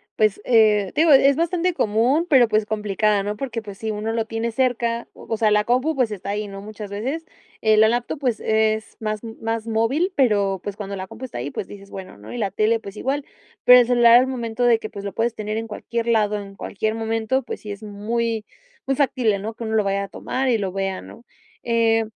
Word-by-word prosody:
pues, 215 Hz, -2 st, +2 dB
eh, 215 Hz, -5 st, +4 dB
digo, 320 Hz, 0 st, +4 dB
e 275 Hz, 0 st, +7 dB
es 280 Hz, -, +4 dB
bastante 345 Hz, +2 st, 0 dB
común, 245 Hz, +8 st, +2 dB
pero, 255 Hz, -5 st, +6 dB
pues, 215 Hz, -1 st, +1 dB
complicada, 210 Hz, -1 st, +1 dB
¿no? 205 Hz, +1 st, -3 dB
Porque, 235 Hz, -2 st, -4 dB
pues 200 Hz, -2 st, -10 dB
sí, 220 Hz, -1 st, -3 dB
uno 215 Hz, +2 st, -3 dB
lo 225 Hz, -1 st, 0 dB
tiene 225 Hz, +1 st, -3 dB
cerca, 235 Hz, -2 st, 0 dB
o -, -, -14 dB
o 225 Hz, -, +1 dB
sea, 215 Hz, -1 st, +2 dB
la 210 Hz, 0 st, +3 dB
compu, 255 Hz, +6 st, +1 dB
pues, 250 Hz, -5 st, +1 dB
está 200 Hz, -1 st, -6 dB
ahí, 205 Hz, +1 st, -2 dB
¿no?, 195 Hz, 0 st, -8 dB
muchas 210 Hz, -1 st, -8 dB
veces. 265 Hz, +11 st, -4 dB, 0.4 s
Eh, 220 Hz, -1 st, +4 dB
la 220 Hz, +1 st, +6 dB
laptop, 240 Hz, +4 st, -2 dB
pues, 250 Hz, -5 st, 0 dB
es 220 Hz, 0 st, 0 dB
más 215 Hz, -1 st, -2 dB, 0.2 s
más 225 Hz, 0 st, -2 dB
móvil, 265 Hz, -, +1 dB
pero, 200 Hz, -7 st, +2 dB
pues, 205 Hz, -1 st, -5 dB
cuando 200 Hz, -1 st, -5 dB
la 190 Hz, 0 st, -6 dB
compu 225 Hz, +5 st, -8 dB
está 230 Hz, -, -7 dB
ahí, 140 Hz, +4 st, -4 dB
pues -, -, -5 dB
dices, 200 Hz, -1 st, -12 dB
bueno, 185 Hz, -, -9 dB
¿no? 105 Hz, +2 st, -11 dB
Y 120 Hz, -, -5 dB
la 195 Hz, -, 0 dB
tele, 215 Hz, +4 st, +1 dB
pues 200 Hz, -1 st, -10 dB
igual. 275 Hz, +5 st, -2 dB, 0.4 s
Pero 250 Hz, 0 st, +10 dB
el -, -, +2 dB
celular, 240 Hz, -1 st, +6 dB
al 255 Hz, +1 st, +3 dB
momento 240 Hz, -2 st, -3 dB
de 235 Hz, -2 st, +4 dB
que, 215 Hz, -, -6 dB
pues, 200 Hz, -, -8 dB
lo 200 Hz, -, -4 dB
puedes 230 Hz, +1 st, -1 dB
tener 215 Hz, +1 st, -3 dB
en 225 Hz, 0 st, -3 dB
cualquier 235 Hz, +2 st, -4 dB
lado, 210 Hz, -2 st, +2 dB
en 195 Hz, 0 st, -11 dB
cualquier 215 Hz, +3 st, -3 dB
momento, 225 Hz, +3 st, -1 dB
pues -, -, -6 dB
sí 210 Hz, -, -8 dB
es 200 Hz, -, -12 dB
muy, 220 Hz, +2 st, -2 dB, 0.4 s
muy 270 Hz, 0 st, 0 dB
factible, 250 Hz, -7 st, +1 dB
¿no?, 220 Hz, +3 st, -5 dB
que 230 Hz, -, -7 dB
uno 220 Hz, 0 st, -1 dB
lo 215 Hz, -, +3 dB
vaya 200 Hz, 0 st, 0 dB
a -, -, -11 dB
tomar 260 Hz, +6 st, -3 dB
y 235 Hz, -3 st, +3 dB
lo 195 Hz, -3 st, -2 dB
vea, 195 Hz, 0 st, -2 dB
¿no? 235 Hz, -, -13 dB, 0.4 s
Eh, 225 Hz, -1 st, +2 dB
220 Hz, 240 wpm, -22 LUFS, 210-240 Hz, 0.4 s, Pero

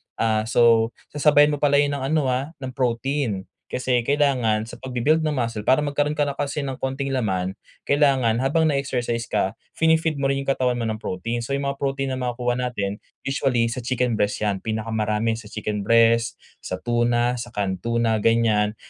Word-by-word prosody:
ah, 110 Hz, -1 st, 0 dB
so 115 Hz, -1 st, +4 dB, 0.2 s
sasabayan 150 Hz, 0 st, +4 dB
mo 145 Hz, -, -2 dB
pala 145 Hz, -1 st, +3 dB
yun 145 Hz, 0 st, +3 dB
ng 140 Hz, -2 st, -3 dB
ano, 145 Hz, -3 st, +1 dB
ah, 135 Hz, +6 st, -3 dB
ng 130 Hz, -, -4 dB
protein. 125 Hz, -4 st, -1 dB, 0.3 s
Kasi 125 Hz, -1 st, 0 dB
kailangan 125 Hz, -6 st, +1 dB
sa -, -, -9 dB
pagbi-build 130 Hz, +5 st, 0 dB
ng 155 Hz, -, 0 dB
muscle 115 Hz, -6 st, -2 dB
para 130 Hz, +5 st, +4 dB
magkaroon 145 Hz, 0 st, 0 dB
ka 150 Hz, -1 st, 0 dB
na 140 Hz, -, -3 dB
kasi 145 Hz, +1 st, -2 dB
ng 135 Hz, -2 st, -3 dB
konting 135 Hz, +1 st, -3 dB
laman, 95 Hz, -8 st, -1 dB, 0.3 s
kailangan 135 Hz, -5 st, +3 dB
habang 160 Hz, +4 st, +2 dB
na-exercise 125 Hz, -5 st, -1 dB
ka 95 Hz, -, 0 dB, 0.2 s
fini-feed 160 Hz, -2 st, +2 dB
mo 135 Hz, -, +1 dB
rin 135 Hz, 0 st, 0 dB
yung 135 Hz, -, +1 dB
katawan 125 Hz, -2 st, +1 dB
mo 120 Hz, -, -3 dB
ng 110 Hz, -1 st, -2 dB
protein. 115 Hz, +5 st, -3 dB
So, 120 Hz, +4 st, -2 dB
yung 140 Hz, -, -2 dB
mga 140 Hz, 0 st, -3 dB
protein 135 Hz, -1 st, -1 dB
na 130 Hz, -, -3 dB
makukuha 125 Hz, 0 st, -1 dB
natin 105 Hz, -5 st, -2 dB, 0.2 s
usually 125 Hz, -4 st, +1 dB
sa 125 Hz, -, -4 dB
chicken 125 Hz, -2 st, -1 dB
breast 105 Hz, +1 st, 0 dB
yan. 100 Hz, -2 st, 0 dB
Pinakamarami 110 Hz, 0 st, -1 dB
sa 110 Hz, -, -11 dB
chicken 105 Hz, -1 st, -4 dB
breast, 115 Hz, 0 st, +4 dB, 0.2 s
sa -, -, -5 dB
tuna, 120 Hz, +1 st, +1 dB
sa 120 Hz, -, -5 dB
canned 95 Hz, -3 st, -1 dB
tuna, 115 Hz, +1 st, 0 dB
ganyan. 110 Hz, -1 st, +2 dB
125 Hz, 185 wpm, -23 LUFS, 115-140 Hz, 0.3 s, so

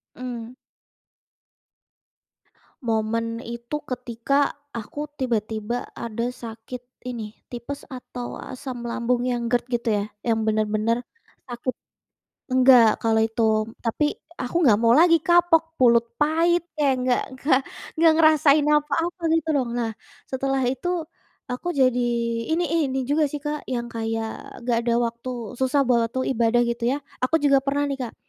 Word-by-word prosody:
Mmm. 245 Hz, -1 st, -6 dB, 2.3 s
Momen 230 Hz, 0 st, -1 dB
itu 235 Hz, +6 st, -5 dB
ketika 255 Hz, +2 st, -1 dB, 0.2 s
aku 290 Hz, +6 st, -6 dB
tiba-tiba 225 Hz, -1 st, -2 dB
ada 235 Hz, +2 st, -3 dB
sakit 230 Hz, 0 st, -8 dB, 0.3 s
ini, 220 Hz, -3 st, -7 dB, 0.2 s
tipes 245 Hz, +4 st, -6 dB
atau 250 Hz, -1 st, -7 dB
asam 250 Hz, -2 st, -7 dB
lambung 245 Hz, +1 st, 0 dB
yang 240 Hz, -1 st, -1 dB
GERD 245 Hz, 0 st, +1 dB
gitu 240 Hz, -2 st, -1 dB
ya. -, -, -1 dB, 0.2 s
Yang 225 Hz, -2 st, +1 dB
bener-bener 215 Hz, +1 st, +1 dB, 0.5 s
aku 245 Hz, +1 st, -3 dB, 0.8 s
nggak 255 Hz, -4 st, +6 dB
kalau 220 Hz, -1 st, +2 dB
itu. 225 Hz, +1 st, -1 dB, 0.4 s
Tapi 240 Hz, +6 st, 0 dB, 0.3 s
aku 255 Hz, +2 st, -6 dB
nggak 210 Hz, -, +7 dB
mau 230 Hz, -, +5 dB
lagi, 330 Hz, +4 st, +5 dB
kapok, 330 Hz, -2 st, +3 dB
mulut 235 Hz, -1 st, +4 dB
pahit, 335 Hz, +3 st, +2 dB
kayak 280 Hz, -4 st, +2 dB
nggak 245 Hz, -, +3 dB, 0.2 s
nggak 270 Hz, -2 st, +3 dB, 0.4 s
nggak 325 Hz, 0 st, +5 dB
ngerasain 310 Hz, -2 st, +5 dB
apa-apa 315 Hz, +4 st, +1 dB
gitu 325 Hz, -1 st, +1 dB
lho. 270 Hz, -, +2 dB
Nah, 235 Hz, -2 st, -1 dB, 0.4 s
setelah 270 Hz, 0 st, -1 dB
itu 265 Hz, +7 st, -2 dB, 0.6 s
aku 250 Hz, +8 st, -5 dB
jadi 255 Hz, -4 st, +2 dB, 0.5 s
ini 340 Hz, +2 st, +2 dB
ih, 330 Hz, +2 st, +1 dB
ini 265 Hz, -, -1 dB
juga 300 Hz, +2 st, +2 dB
sih, 295 Hz, -, -4 dB
Kak, 295 Hz, +1 st, -4 dB
yang 240 Hz, -1 st, -2 dB
kayak 225 Hz, 0 st, -4 dB
nggak 235 Hz, -1 st, +2 dB
ada 235 Hz, -1 st, +1 dB
waktu 235 Hz, 0 st, -4 dB
susah 260 Hz, +1 st, +1 dB
buat 235 Hz, -2 st, +2 dB
waktu 260 Hz, +1 st, -1 dB
ibadah 235 Hz, +1 st, +3 dB
gitu 235 Hz, 0 st, -3 dB
ya, 275 Hz, -, 0 dB, 0.3 s
aku 320 Hz, +5 st, +3 dB
juga 275 Hz, -2 st, +3 dB
pernah 285 Hz, +1 st, 0 dB
nih, 275 Hz, -, -3 dB
Kak, -, -, -17 dB
250 Hz, 140 wpm, -24 LUFS, 235-285 Hz, 2.3 s, nggak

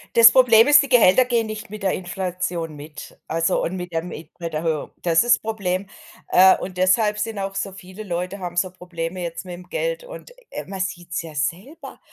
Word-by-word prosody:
Das 230 Hz, 0 st, +9 dB
Problem 230 Hz, -3 st, +6 dB
ist, 295 Hz, -, +8 dB
die 275 Hz, -, -3 dB
Gehälter 245 Hz, -1 st, +5 dB
gehen 235 Hz, -2 st, 0 dB
nicht 215 Hz, 0 st, -7 dB
mit 215 Hz, -1 st, -9 dB
der 190 Hz, -, +2 dB
Inflation 180 Hz, -3 st, -4 dB
mit, 150 Hz, +1 st, -11 dB
also 165 Hz, +1 st, 0 dB
und 185 Hz, -, -3 dB
mit 180 Hz, -1 st, -6 dB
der 165 Hz, -1 st, -1 dB
Miet 165 Hz, -2 st, -9 dB
Mieterhöhung. 160 Hz, -2 st, -3 dB
Das 170 Hz, +5 st, +3 dB
ist 240 Hz, 0 st, +4 dB
Problem. 200 Hz, -3 st, -3 dB, 0.4 s
Äh, 185 Hz, +1 st, +7 dB
und 185 Hz, -1 st, -7 dB
deshalb 210 Hz, +3 st, +2 dB
sind 220 Hz, -1 st, -3 dB
auch 195 Hz, 0 st, -3 dB
so 195 Hz, 0 st, -3 dB
viele 185 Hz, +2 st, -10 dB
Leute 180 Hz, +1 st, -4 dB
haben 175 Hz, -2 st, -6 dB
so 180 Hz, +1 st, 0 dB
Probleme 180 Hz, 0 st, -6 dB
jetzt 170 Hz, +1 st, -5 dB
mit'm 180 Hz, 0 st, -9 dB
Geld -, -, -3 dB
und, -, -, -11 dB, 0.2 s
äh, -, -, -5 dB
man 195 Hz, -1 st, -7 dB
sieht's 175 Hz, -2 st, -4 dB
ja 160 Hz, -2 st, -10 dB
selber, 180 Hz, -, -5 dB
185 Hz, 200 wpm, -22 LUFS, 175-215 Hz, 0.4 s, Das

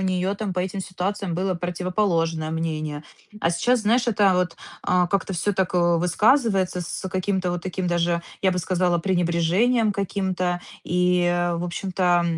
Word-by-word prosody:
нее 185 Hz, +1 st, 0 dB
там 205 Hz, -2 st, -3 dB
по 180 Hz, -, -1 dB
этим 190 Hz, +2 st, -3 dB
ситуациям 190 Hz, 0 st, -3 dB
было 185 Hz, +1 st, 0 dB
противоположное 175 Hz, -2 st, -1 dB
мнение? 155 Hz, -2 st, -3 dB, 0.4 s
А, 165 Hz, -, +2 dB
сейчас, 240 Hz, +9 st, +2 dB
знаешь, 235 Hz, +3 st, +2 dB
это 205 Hz, -4 st, +4 dB
вот, 180 Hz, -2 st, 0 dB, 0.3 s
а, 180 Hz, -1 st, +2 dB
как-то 195 Hz, +1 st, -1 dB
всё 185 Hz, +4 st, 0 dB
так, 185 Hz, -1 st, -1 dB
э, 175 Hz, -1 st, +3 dB
высказывается 195 Hz, -, +2 dB
с 175 Hz, +2 st, -4 dB
каким-то 185 Hz, 0 st, -1 dB
вот 175 Hz, -1 st, -3 dB
таким 185 Hz, 0 st, -3 dB
даже, 170 Hz, 0 st, +1 dB, 0.2 s
я 190 Hz, -, +4 dB
бы 180 Hz, -, -1 dB
сказала, 175 Hz, 0 st, +1 dB
пренебрежением 185 Hz, +6 st, +2 dB
каким-то, 185 Hz, -2 st, -1 dB, 0.2 s
и 180 Hz, 0 st, +2 dB, 0.3 s
в 170 Hz, -, -3 dB
общем-то, 180 Hz, -1 st, +1 dB
180 Hz, 155 wpm, -23 LUFS, 175-195 Hz, 0.4 s, это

